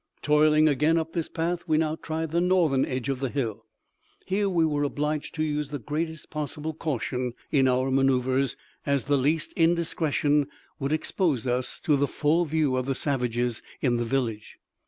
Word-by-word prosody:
Toiling 150 +1 +5
again 150 +3 +3
up 165 0 -2
this 165 -2 -2
path, 175 +1 -2
we 155 - +3
now 155 0 +1
tried 160 -1 -4
the 170 +1 +2
northern 175 -7 +3
edge 130 0 -3
of 135 -2 -1
the 135 -1 -1
hill. 115 -5 -3 0.6
Here 200 +1 +1
we 170 -3 +3
were 145 -2 0
obliged 150 +2 -2
to 155 - 0
use 150 -1 -1
the 145 +1 -4
greatest 155 +4 -4
possible 150 +1 -4
caution 130 -5 -2 0.2
in 135 -3 +4
our 130 +1 +1
maneuvers, 130 0 +2 0.3
as 140 -2 +1
the 145 0 +2
least 150 +4 +1
indiscretion 160 -3 +2 0.3
would 140 0 -2
expose 155 - 0
us 125 0 -1
to 150 - +3
the 140 +1 +2
full 160 +5 +1
view 150 -4 +1
of 130 0 -2
the 135 - 0
savages 125 -4 -1 0.2
in 120 -3 +1
the 120 - 0
village. 115 -3 -2
145 Hz, 175 wpm, -26 LUFS, 130-160 Hz, 0.6 s, Toiling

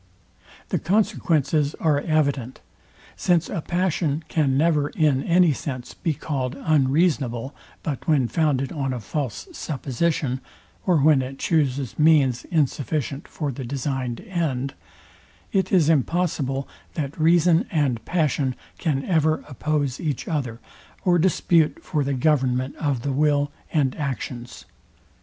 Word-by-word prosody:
The - - 0
consequences 155 -6 +1
are 150 -3 +2
evident. 140 -5 0 0.6
Since 175 -3 +1
a 165 - -3
passion 170 -3 0
can 140 -5 +2
never, 150 -1 +2
in 150 -5 +2
any 175 -2 +4
sense, 130 -2 -6
be 160 -3 -2
called 130 -3 -3
unreasonable, 140 -4 +1 0.3
but 145 -5 -4
when 145 -6 +3
founded 135 0 0
on 135 -5 -2
a 125 - -3
false 130 - -4
supposition 140 - -1 0.5
or 180 -3 +4
when 145 -1 +5
it 130 +1 -6
chuses 140 -5 0
means 145 -6 +4
insufficient 145 -3 -1
for 150 -3 -3
the 130 +1 -6
designed 130 -1 -3
end, 155 - -2 0.8
it 190 -1 +1
is 175 -6 +4
impossible, 150 -3 +1 0.3
that 150 -1 -4
reason 170 +1 +4
and 135 -8 0
passion 145 -4 0 0.2
can 140 -5 0
ever 160 -3 +1
oppose 145 -1 -1
each 150 -6 -3
other, 130 -8 -2 0.5
or 175 -2 +4
dispute 165 -2 +2
for 150 -4 -1
the 140 0 -1
government 130 -2 +1
of 140 -6 -1
the 140 - -1
will 145 0 +2 0.2
and 140 -5 +1
actions. 125 -4 -5
145 Hz, 130 wpm, -24 LUFS, 130-160 Hz, 0.8 s, when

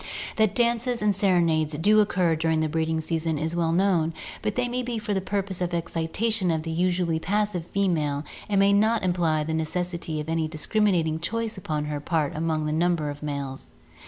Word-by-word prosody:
That 215 -2 +3
dances 240 0 +1
and 205 -2 +3
serenades 170 -6 +2
do 210 +7 +4
occur 180 -5 +2
during 160 0 +1
the 155 - +1
breeding 160 +1 0
season 160 -1 -1
is 160 +3 -2
well 165 -1 +1
known, 170 -3 +2 0.3
but 215 -1 -2
they 250 0 +1
may 245 +1 -2
be 240 -1 -3
for 210 -1 -2
the 190 - 0
purpose 195 -1 -2
of 175 -1 -1
excitation 175 +5 -1
of 160 -1 0
the 165 - -4
usually 175 -1 +1
passive 200 -2 -1
female 155 -8 0 0.3
and 200 - +1
may 200 0 +5
not 220 +1 +3
imply 170 -4 +1
the 160 +1 -3
necessity 165 0 -2
of 150 - -5
any 165 -1 0
dis 155 -1 -4
criminating 180 -8 +2
choice 225 +6 -2
upon 155 -5 -3
her 150 -1 -3
part 150 -1 -1
among 155 -1 -1
a - - -1
number 165 -2 +1
of 145 - -10
males. 140 - -3
170 Hz, 195 wpm, -26 LUFS, 160-200 Hz, 0.3 s, may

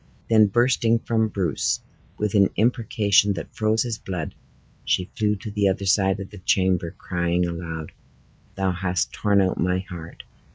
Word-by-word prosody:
Then 110 -2 +6
bursting 120 +1 +2
from 115 -1 0
Bruce, 95 -8 -1 0.4
with 105 -1 -1
an 100 -2 +5
imprecation 105 -3 +2
that 95 - -7
froze 110 0 +1
his 115 -3 -4
blood, 90 -5 -5 0.5
she 65 +8 0
flew 105 -4 +1
to 105 +2 -7
the 100 -1 +1
other 95 +1 -1
side 95 0 +2
of 100 0 -7
the 105 - -10
chamber, 95 -2 +1
crying 85 0 0
aloud, 85 -2 -5 0.6
"Thou 95 -1 0
hast 90 0 -1
torn 100 -2 +2
out 95 -1 0
my 90 +1 +1
heart! 90 -3 -8
95 Hz, 160 wpm, -24 LUFS, 90-105 Hz, 0.6 s, Then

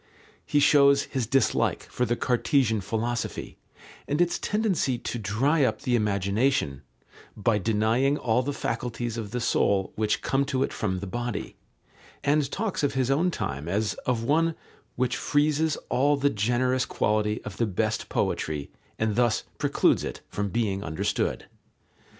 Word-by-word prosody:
He 145 - +3
shows 140 -1 +5
his 130 -6 -3
dislike 135 0 +1
for 125 - -2
the 120 - +1
Cartesian 120 -3 +1
philosophy 115 +4 -3 0.5
and 145 - -1
its 175 0 +2
tendency 200 - 0
to 120 0 -4
dry 130 - +1
up 110 -4 0
the 125 - +2
imagination 100 - +1 0.6
"by 105 0 +2
denying 115 +7 +2
all 120 -1 +1
the 140 +3 -2
faculties 120 -4 -3
of 110 -3 -5
the 125 +3 -3
soul 100 -4 +1
which 105 -1 0
come 135 +1 +1
to 135 -2 0
it - - -3
from 95 -3 -2
the - - -4
body," 120 +2 -4 0.7
and 145 -1 +2
talks 205 +4 -2
of 145 -2 0
his 130 0 +1
own 165 +7 +2
time 70 - -4
as 105 +3 0
of 120 -3 +1
one 160 +5 +2 0.4
"which 125 0 0
freezes 150 +1 +1
all 145 +3 +3
the 140 +1 +2
generous 125 +4 +1
quality 105 0 0
of 105 - -7
the 115 - +1
best 110 +3 -1
poetry 75 -2 -2 0.3
and 110 -1 0
thus 120 -2 +2 0.2
precludes - - +2
it - - -5
from 100 0 -2
being 100 -3 -1
understood." 80 -1 -1
120 Hz, 155 wpm, -26 LUFS, 105-140 Hz, 0.7 s, shows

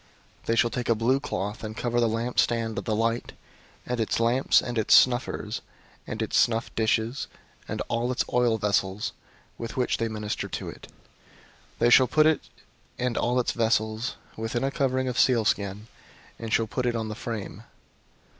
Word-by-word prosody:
004:009 - - -27
They 115 - +2
shall 120 0 +3
take 125 -1 -3
a 115 - +4
blue 120 +5 +2
cloth, 105 -6 -4
and 110 0 -6
cover 120 0 0
the 120 - +3
lampstand 115 0 0
of - - -8
the 110 - 0
light, 115 +2 -1 0.5
and 125 -1 -2
its 110 - 0
lamps, 120 +3 +4
and 120 -2 -2
its 110 - +5
snuffers, 125 0 +2 0.5
and 110 0 -3
its 110 - +1
snuff 115 -1 +1
dishes, 110 +3 0 0.4
and - - -3
all 120 +2 0
its 125 - 0
oil 120 -2 +3
vessels, 100 -1 0 0.5
with 115 +2 -6
which 125 - +1
they 115 - -1
minister 105 -1 -3
to - - -5
it. - - -11 0.9
004:010 - - -31
They 120 - +3
shall 130 +1 +7
put 155 +5 +4
it 160 -1 +3 0.6
and 125 -1 -1
all 125 +1 +1
its 125 - +1
vessels 110 +1 0 0.2
within 115 +2 -2
a 135 - 0
covering 130 -1 0
of 125 -1 -1
sealskin, 105 -4 +2 0.5
and 115 -1 -5
shall 115 - +3
put 125 +3 -2
it 120 - 0
on 110 -1 -2
the - - -3
frame. 105 -3 -6
115 Hz, 185 wpm, -26 LUFS, 110-125 Hz, 0.9 s, shall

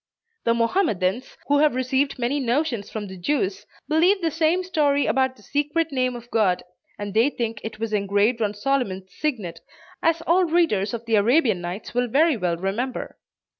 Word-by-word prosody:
The 230 0 +3
Mohammedans, 230 - 0
who 285 0 +3
have 300 -3 +3
received 265 +2 0
many 250 +4 0
notions 250 -3 -1
from 215 -2 -5
the 190 -1 -9
Jews, 200 -2 -1 0.2
believe 340 +7 +3
the 330 -3 0
same 330 +3 +1
story 295 -6 +1
about 260 -1 +1
the 210 - -20
secret 295 +5 -1
name 255 -2 0
of 240 0 -11
God, 190 -5 +2 0.3
and 205 -1 -5
they 230 +6 +4
think 230 -5 -4
it 220 -1 -6
was 225 -1 -3
engraved 205 +3 +1
on 210 -1 0
Solomon's 205 -6 -2
signet, 210 - -3 0.4
as 330 0 +1
all 355 +2 +3
readers 275 - +1
of 230 0 -8
the 225 -2 +2
Arabian 225 - +3
Nights 175 +4 -6
will 245 +1 +1
very 300 +6 +3
well 180 -6 -1
remember. 205 +8 -3
245 Hz, 175 wpm, -23 LUFS, 205-295 Hz, 0.4 s, they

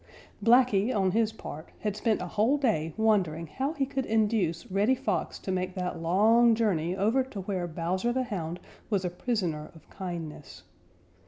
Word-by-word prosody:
Blacky 235 -2 +4
on 195 -5 +2
his 220 +1 +2
part 155 -7 -9
had 210 -2 -1
spent 215 -3 0
a - - -4
whole 220 +9 +2
day 210 - 0
wondering 190 -8 +2
how 265 - -3
he 280 -4 0
could 265 -1 -3
induce 210 -6 +1
Reddy 205 +7 +3
Fox - - -2
to 190 - -5
make 185 0 -2
that 180 -3 -3
long 220 +7 +5
journey 185 -6 0
over 220 +7 +2
to 220 -7 -7
where 185 -2 -2
Bowser 175 +7 -1
the 260 +1 0
Hound 180 -7 -4 0.3
was 200 -4 0
a 180 - -1
prisoner 175 -7 -2
of 160 - -17
kindness. 165 - -7
200 Hz, 170 wpm, -28 LUFS, 175-230 Hz, 0.3 s, long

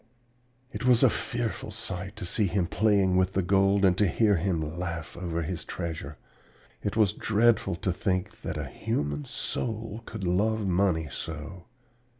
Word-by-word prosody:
"It - - -5
was 125 -2 +5
a - - +6
fearful - - -3
sight 95 +2 -4
to 100 -3 -6
see 100 +4 +1
him 95 0 +1
playing 100 -1 +3
with 95 +1 +2
the 95 - +1
gold 100 +2 +3
and 90 -2 +5
to 105 - +4
hear 105 +3 +3
him 85 -2 -1
laugh 85 -2 -4
over 85 -1 -2
his 85 +2 -3
treasure. 80 -4 -5 0.6
It 100 +2 -2
was 105 -3 +4
dreadful 110 -4 +2
to 90 +1 -1
think 90 0 -2
that - - -4
a - - -3
human 75 0 -2
soul 110 - -3
could 110 -3 -6
love 105 +4 +1
money 90 -4 +2
so. 80 +5 -6
95 Hz, 160 wpm, -28 LUFS, 85-105 Hz, 0.6 s, a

